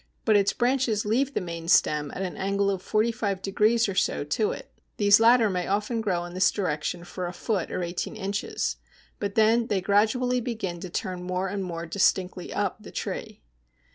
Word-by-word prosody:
But 220 Hz, -, +4 dB
its 200 Hz, -1 st, +4 dB
branches 245 Hz, -4 st, +1 dB
leave 260 Hz, +6 st, +1 dB
the -, -, +1 dB
main 170 Hz, -2 st, -6 dB
stem 150 Hz, -4 st, +3 dB
at 190 Hz, -, -3 dB
an 185 Hz, -, -4 dB
angle 200 Hz, +1 st, 0 dB
of 190 Hz, -2 st, -3 dB
forty 215 Hz, +4 st, +1 dB
five 200 Hz, -4 st, -2 dB
degrees 215 Hz, +4 st, +2 dB
or 195 Hz, -, -2 dB
so 185 Hz, -, 0 dB
to 150 Hz, +9 st, 0 dB
it; -, -, -8 dB, 0.3 s
these 205 Hz, 0 st, +6 dB
latter 230 Hz, 0 st, +6 dB
may 180 Hz, -3 st, -2 dB
often 210 Hz, +4 st, 0 dB
grow 180 Hz, -5 st, -1 dB
in 175 Hz, -, -9 dB
this 185 Hz, +1 st, +4 dB
direction 170 Hz, -2 st, -2 dB
for 180 Hz, 0 st, -5 dB
a 175 Hz, -, -6 dB
foot 190 Hz, -1 st, -2 dB
or 180 Hz, -, -2 dB
eighteen 175 Hz, +5 st, -4 dB
inches, 200 Hz, -1 st, -2 dB, 0.4 s
but 200 Hz, -1 st, -3 dB
then 225 Hz, +1 st, +4 dB
they 200 Hz, -, +1 dB
gradually 225 Hz, +6 st, +2 dB
begin 215 Hz, -8 st, -4 dB
to 185 Hz, +1 st, -7 dB
turn 180 Hz, +1 st, -3 dB
more 185 Hz, +1 st, -2 dB
and 200 Hz, 0 st, -3 dB
more 170 Hz, -2 st, -5 dB
distinctly 185 Hz, 0 st, 0 dB
up -, -, -1 dB
the -, -, -11 dB
tree. -, -, -5 dB
200 Hz, 200 wpm, -26 LUFS, 180-220 Hz, 0.4 s, these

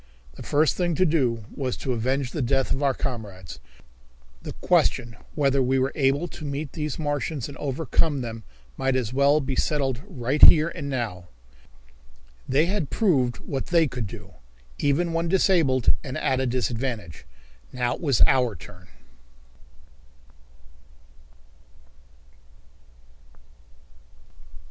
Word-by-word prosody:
The -, -, -12 dB
first 150 Hz, 0 st, +1 dB
thing 175 Hz, -2 st, 0 dB
to 185 Hz, -, +3 dB
do 125 Hz, -, 0 dB
was 130 Hz, -3 st, -3 dB
to 130 Hz, -, -2 dB
avenge 130 Hz, +2 st, -1 dB
the 155 Hz, -, -3 dB
death 135 Hz, +1 st, 0 dB
of 135 Hz, -, 0 dB
our 135 Hz, -2 st, +2 dB
comrades. 100 Hz, -, -6 dB, 0.8 s
The -, -, -7 dB
question 120 Hz, -2 st, +1 dB, 0.2 s
whether 140 Hz, -2 st, +2 dB
we 130 Hz, +1 st, +1 dB
were 130 Hz, +1 st, +1 dB
able 140 Hz, +4 st, +1 dB
to -, -, -10 dB
meet 145 Hz, 0 st, -4 dB
these 150 Hz, -3 st, -4 dB
Martians 145 Hz, -3 st, -2 dB
and 140 Hz, -, -10 dB
overcome 145 Hz, +1 st, -1 dB
them 115 Hz, -2 st, -6 dB, 0.4 s
might 135 Hz, 0 st, 0 dB
as 125 Hz, -2 st, -1 dB
well 140 Hz, +3 st, +4 dB
be 135 Hz, -1 st, -3 dB
settled 135 Hz, -3 st, 0 dB
right 140 Hz, -, -2 dB
here 155 Hz, +1 st, +8 dB
and 140 Hz, -3 st, -6 dB
now. 115 Hz, -9 st, -3 dB, 1.2 s
They 145 Hz, +4 st, +3 dB
had 180 Hz, -6 st, -2 dB
proved 135 Hz, -, +1 dB
what 135 Hz, -2 st, -4 dB
they 170 Hz, -2 st, +4 dB
could 125 Hz, -5 st, -4 dB
do, 95 Hz, -3 st, -11 dB, 0.5 s
even 165 Hz, +4 st, +1 dB
when 165 Hz, +1 st, 0 dB
disabled 165 Hz, -, +3 dB
and 130 Hz, -3 st, -5 dB
at 130 Hz, -1 st, 0 dB
a 130 Hz, -, 0 dB
disadvantage. 120 Hz, -, -3 dB, 0.5 s
Now 125 Hz, -1 st, -1 dB
it -, -, -8 dB
was 140 Hz, -8 st, +3 dB
our 125 Hz, -5 st, +2 dB
turn. 90 Hz, +3 st, -14 dB
135 Hz, 130 wpm, -25 LUFS, 120-150 Hz, 1.2 s, here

